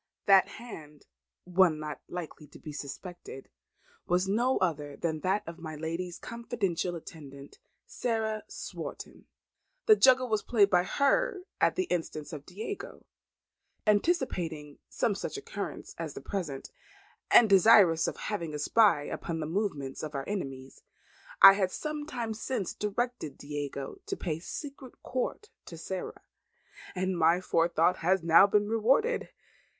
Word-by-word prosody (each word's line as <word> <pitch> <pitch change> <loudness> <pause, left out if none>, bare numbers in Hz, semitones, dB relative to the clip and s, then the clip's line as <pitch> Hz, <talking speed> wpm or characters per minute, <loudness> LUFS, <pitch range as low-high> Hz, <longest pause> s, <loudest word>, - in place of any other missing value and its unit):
That 195 -2 +6
hand, 155 -11 -11 0.4
one 180 -3 +3
not 150 -2 -6
likely 160 -3 -7
to 145 - -15
be 155 - -9
suspected, 145 0 -8 0.6
was 180 +2 +2
no 240 +6 +2
other 150 -5 -1
than 160 -2 -2
that 190 +5 0
of 165 +1 -8
my 160 -2 -7
lady's 165 +3 -4
confidential 210 -7 -3
attendant, 140 -4 -11 0.3
Sarah 220 -2 -2
Swarton. - - -8 0.6
The 435 - +8
juggle 260 -6 +5
was 215 -3 0
played 205 -4 +3
by 180 -1 +4
her 375 - +1 0.2
at - - +3
the 370 - +1
instance 165 - -4
of 145 -2 -8
Diego. 375 - -7 0.8
Anticipating 190 - 0
some 230 - 0
such 200 - -5
occurrence 450 +4 -6
as - - -5
the - - -5
present, 165 -9 -5 0.6
and 235 - +7
desirous 195 -4 +6
of - - -4
having 170 -7 -3
a - - -2
spy 200 0 +4
upon 165 +2 -4
the 155 - -2
movements 155 -6 -3
of 155 -1 -6
our 135 - -4
enemies, 135 -10 -5 0.6
I 195 0 +10
some 300 +9 -5
time 235 -6 -3
since 220 -3 -3
directed 210 - -3
Diego 145 - -6
to 390 -1 -3
pay 160 -3 -3
secret 275 - -8
court 260 - -3
to 165 - -9
Sarah, 185 +3 -6 0.7
and 185 0 -1
my 170 +1 +4
forethought 170 -1 +2
has 185 +1 +1
now 170 +4 +7
been 205 0 +2
rewarded. 260 - +2
185 Hz, 140 wpm, -29 LUFS, 160-225 Hz, 0.8 s, I